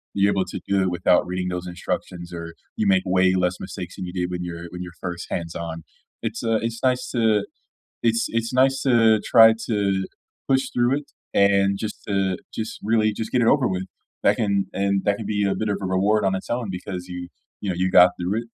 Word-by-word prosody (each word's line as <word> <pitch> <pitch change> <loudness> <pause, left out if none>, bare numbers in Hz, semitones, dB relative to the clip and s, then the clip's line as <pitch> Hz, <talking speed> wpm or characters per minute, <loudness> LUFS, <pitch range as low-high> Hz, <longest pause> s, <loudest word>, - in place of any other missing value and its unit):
You're 100 0 +3
able 95 -1 0
to - - -6
do 100 -1 +2
it 95 - +1
without 90 0 +2
reading 90 0 -2
those 90 0 -4
instructions, 90 0 -5
or 85 -1 -7 0.2
you 220 -2 0
make 190 -1 +4
way 95 0 +3
less 90 0 +1
mistakes 90 -2 -7
than 90 - -4
you 90 - -7
did 90 -1 -2
when 90 0 -3
you're 85 -1 -6
when 90 0 -7
you're 90 -1 -7
first 85 -1 -5
hands 85 -1 -3
on. 80 -1 -5 0.4
It's, 115 0 -3
uh, 115 -1 +2
it's 115 0 -3
nice 130 -1 +1
to 110 -4 +2 0.6
It's 115 0 +2
it's 115 0 -1
nice 135 +1 +3
to 115 -4 +4
try 115 -1 +7
to 100 -4 0 0.4
push 135 -1 +2
through 125 +3 +2
it, 145 - -10 0.2
and 100 0 +3
just 105 +1 -6
to 95 -2 0 0.2
just 110 0 -5
really 110 0 +2
just 110 +1 -5
get 125 - +2
it 115 - +3
over 135 -3 +4
with. 95 -1 -2 0.4
That - - +4
can 100 -2 +1
and 100 0 0
that 100 0 +2
can 110 - -6
be 105 -1 0
a 95 - 0
bit 110 +2 -2
of 100 - 0
a - - -3
reward 100 +3 +2
on 95 0 +2
its 95 - -6
own 120 -3 -2
because 90 0 -6
you 90 -1 -6 0.3
you 100 - -3
know, 90 - -1
you 95 +1 0
got 90 0 +8
through 90 +5 -1
it, - - -11
100 Hz, 230 wpm, -23 LUFS, 90-115 Hz, 0.6 s, got